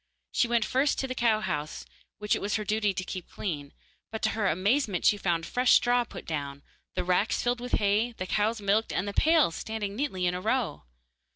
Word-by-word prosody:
She 240 - +2
went 235 -2 +2
first 275 +3 +1
to 265 - -1
the 255 - -3
cow 230 -4 +2
house, 150 -4 -3 0.3
which 210 0 0
it - - -4
was 205 +1 -1
her 215 - -1
duty 210 0 +1
to 185 -1 -4
keep 185 -1 -7
clean, 145 -7 -4 0.4
but 220 - -5
to - - +3
her 215 -3 0
amazement 195 - +1
she - - +6
found 175 -5 -1
fresh 250 +6 +3
straw 245 0 +4
put - - -10
down, 140 -3 -4 0.3
the 180 - 0
racks 180 +4 +1
filled 245 0 0
with 245 - -6
hay, 210 +4 +2
the 185 - -5
cows 215 +4 0
milked, 205 +2 +1
and 190 - -1
the 200 - -3
pails 315 - +4
standing 210 +1 -4
neatly 220 -8 -1
in 175 - +1
a 180 - -4
row. 225 - -1
210 Hz, 215 wpm, -28 LUFS, 185-240 Hz, 0.4 s, she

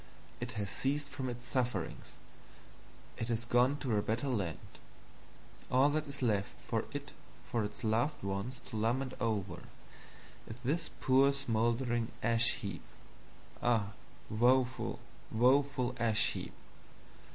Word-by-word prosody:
It - - -4
has 100 -2 -3
ceased 145 +2 -1
from 130 -1 -3
its 120 0 -6
Sufferings, 120 -10 -1 1.0
it 115 - -2
has 115 0 -1
gone 125 +4 +4
to 130 -5 -1
a - - +3
better 120 +7 -1
Land; 100 -10 -1 1.1
all 130 +3 +5
that 155 0 0
is 140 -1 -4
left 105 -4 +1 0.2
of - - +1
it - - -5 0.4
for 115 -2 +1
its 105 +2 -6
loved 115 +6 +1
Ones 100 +6 -3
to 110 - -5
lament 125 +4 0
over, 110 -5 -1 0.9
is 110 - -6
this 160 +4 0
poor 135 +2 +5
smoldering 120 -2 0
Ash 115 0 +4
heap. 100 -2 -5 0.8
Ah, 110 -4 +2 0.4
woeful, 125 +3 +2 0.3
woeful 130 +2 +3
Ash 115 -2 +3
heap! - - -5
120 Hz, 130 wpm, -34 LUFS, 110-130 Hz, 1.1 s, all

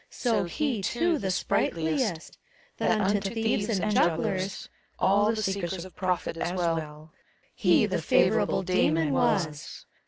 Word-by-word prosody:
So 235 -6 0
he, 250 - -2
too, 325 - 0
the 195 - -2
sprightliest: 170 +1 -1 0.4
That 220 -2 +1
unto 200 0 0
thieves 225 -2 -1
and 215 +3 -1
jugglers 185 +2 0 0.2
— - - -40
All 205 +2 +3
the 220 -1 -2
seekers 190 -2 -3
of 185 - -13
profit, 180 -3 -2
as 175 +1 -2
well, 160 -3 -3 0.2
— - - -38
He - - +3
the - - -2
favorable - - +2
Dasmon 165 -4 +1
was. 155 -1 -1
190 Hz, 145 wpm, -27 LUFS, 165-210 Hz, 0.4 s, All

